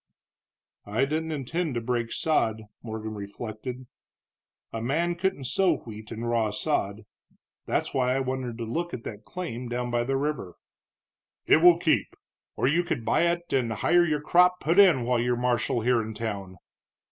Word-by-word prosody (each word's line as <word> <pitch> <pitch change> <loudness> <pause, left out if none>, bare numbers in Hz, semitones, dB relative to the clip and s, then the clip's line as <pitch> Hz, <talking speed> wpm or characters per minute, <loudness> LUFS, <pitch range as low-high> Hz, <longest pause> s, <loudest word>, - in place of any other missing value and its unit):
"I 110 +6 +1
didn't 160 +3 -2
intend 155 +1 -2
to - - +1
break 120 -1 -1
sod," 110 -8 +1 0.2
Morgan 110 -1 -5
reflected, 110 +5 -6 0.9
"a 115 - -3
man 160 +9 0
couldn't 180 -4 -1
sow 170 +5 +2
wheat 110 -3 -10
in 115 +1 -5
raw 115 -2 +1
sod. 105 -3 -2 0.6
That's - - -1
why 130 -1 +2
I - - +1
wanted 130 -3 -3
to 120 - -4
look 170 +10 -3
at 115 - -9
that 105 0 -8
claim 125 -10 -5
down 120 0 -2
by 120 0 +1
the 135 +2 0
river." 135 - -3 0.9
"It - - +6
will 170 +1 +7
keep. 165 -2 +1 0.4
Or - - +1
you 165 +5 +3
could 150 -10 -3
buy 170 +9 +3
it, 170 0 -2
and 125 -4 +1
hire 175 +10 +3
your 150 -3 0
crop 180 +3 +4
put 170 +5 +2
in 175 -11 +6
while 125 0 +1
you're 120 +1 +1
marshal 120 -1 0
here 120 0 +3
in 110 0 -6
town." 100 -4 -5
125 Hz, 170 wpm, -27 LUFS, 115-160 Hz, 0.9 s, will